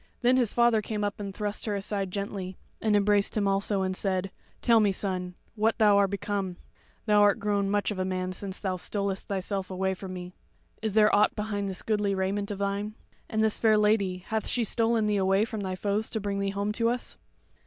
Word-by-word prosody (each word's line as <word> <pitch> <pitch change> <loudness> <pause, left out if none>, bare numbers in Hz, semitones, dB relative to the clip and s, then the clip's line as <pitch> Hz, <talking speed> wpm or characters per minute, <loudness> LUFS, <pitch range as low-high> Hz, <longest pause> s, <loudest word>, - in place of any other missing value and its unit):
Then 250 +1 +5
his 240 -5 +2
father 235 -2 +3
came 210 0 -3
up 205 +1 -2
and 200 -1 -4
thrust 205 +1 -3
her 210 -2 -1
aside 195 -1 -2
gently 195 -1 -5 0.2
and 215 -2 +2
embraced 205 +1 +3
him 205 -1 +2
also, 195 0 +1
and 185 0 -1
said: 190 -1 0 0.3
"Tell 235 -2 +5
me, 210 -2 +3
son, 185 -2 -3 0.2
what 220 0 +1
thou 210 -3 +5
are 200 0 +4
become? 200 -2 -3 0.5
Thou 210 -2 +4
art 205 -1 +5
grown 200 -1 0
much 205 +1 +1
of 200 - -4
a - - +1
man 185 0 -2
since 190 +1 -5
thou 185 -2 -2
stolest 200 +1 -2
thyself 195 -1 -3
away 190 0 -1
from 190 0 -8
me. 180 0 -7 0.5
Is 220 -2 -1
there 215 0 +5
aught 210 - +3
behind 205 -2 -2
this 190 - -5
goodly 210 -2 0
raiment 195 +2 -1
of 205 - -3
thine? 200 +2 -2 0.3
And 220 -2 +1
this 220 -1 +2
fair 220 -2 +4
lady, 200 -4 +1
hath 220 -1 -2
she 245 - 0
stolen 225 0 +2
thee 210 -1 +1
away 195 +2 +3
from 220 -2 -5
thy 190 -1 -3
foes 205 +3 -1
to 220 - -2
bring 200 -1 -2
thee 200 0 0
home 200 +1 -1
to 230 +2 +1
us?" 245 +1 -3
200 Hz, 215 wpm, -28 LUFS, 195-215 Hz, 0.5 s, Then